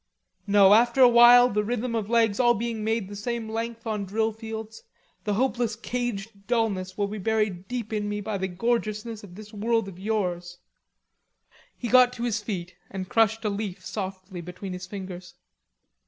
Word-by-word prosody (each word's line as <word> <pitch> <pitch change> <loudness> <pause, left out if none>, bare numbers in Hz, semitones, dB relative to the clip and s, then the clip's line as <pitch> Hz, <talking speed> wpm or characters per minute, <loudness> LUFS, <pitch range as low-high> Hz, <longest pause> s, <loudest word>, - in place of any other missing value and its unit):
No, 200 -1 +6
after 235 +4 +4
a 250 - +10
while 240 +1 +8
the 210 -3 0
rhythm 240 +2 -2
of 220 -2 -2
legs 230 -2 +2
all 240 -1 +5
being 230 0 -3
made 220 -2 0
the 205 - -8
same 230 +2 -3
length 230 +1 -4
on 215 -2 -2
drill 220 +3 0
fields, 220 0 -7 0.4
the 210 -1 0
hopeless 240 -1 0
caged 225 -4 -4
dullness 210 -6 -1
will 205 - +1
be 210 +1 -5
buried 205 -3 -1
deep 235 -3 -4
in 205 -1 -1
me 205 0 -2
by 205 -1 -3
the 190 - -1
gorgeousness 215 +2 -2
of 180 -3 -12
this 215 +1 -11
world 225 0 0
of 185 -2 -10
yours!" 180 -4 -2 1.2
He 245 - -4
got 250 +1 +6
to 235 - -6
his 225 -3 -1
feet 185 -4 -5 0.2
and 190 -1 -6
crushed 225 0 +2
a - - +2
leaf 200 -2 -5
softly 190 -2 -5
between 180 +2 -7
his 180 0 -7
fingers. 185 -3 -8
215 Hz, 180 wpm, -26 LUFS, 195-230 Hz, 1.2 s, a